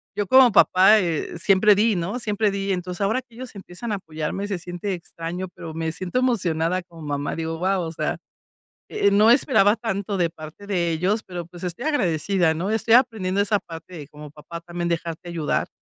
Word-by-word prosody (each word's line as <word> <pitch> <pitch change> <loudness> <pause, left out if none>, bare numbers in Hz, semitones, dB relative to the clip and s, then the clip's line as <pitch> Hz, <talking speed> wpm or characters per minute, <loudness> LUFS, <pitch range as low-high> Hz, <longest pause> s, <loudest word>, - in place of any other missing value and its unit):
yo 205 -1 -1
como 260 +2 +7
papá, 200 +1 +6
eh, 170 -2 -2
siempre 195 +3 +5
di, 210 +2 +2
no, 185 +7 -3
siempre 210 -2 0
di. 195 0 -2
Entonces, 180 0 -5
ahora 220 +6 +1
que 240 -3 -23
ellos 250 -2 -9
empiezan 195 +3 -7
a - - +1
apoyarme, 160 +2 -4
se 195 -3 -3
siente 175 +3 -4
extraño, 175 +1 -6
pero 160 -1 -8
me 160 0 -2
siento 185 +8 -2
emocionada 185 -8 0
como 170 -2 -15
mamá, 145 -1 -3
digo: 165 0 -3
"Guau, 185 +1 0
o 165 - -4
sea, - - -2 0.7
eh - - -2
eh, - - -3
no 210 +2 +5
esperaba 235 -5 +4
tanto 205 -3 -3
de 170 -2 +1
parte 155 +4 -11
de 180 -4 0
ellos", 185 +7 0
pero, 175 -2 -6
pues, 175 +1 -13
estoy 180 - -4
agradecida, 180 - +1
¿no? 185 +6 -2
Estoy 225 +1 +3
aprendiendo 220 -7 +2
esa 205 0 +1
parte 165 0 -11
de 150 -4 -8
como 150 0 -12
papá 165 +3 -9
también 175 0 -4
dejarte 170 +1 -4
ayudar, 165 -4 -1
185 Hz, 200 wpm, -23 LUFS, 165-205 Hz, 0.7 s, como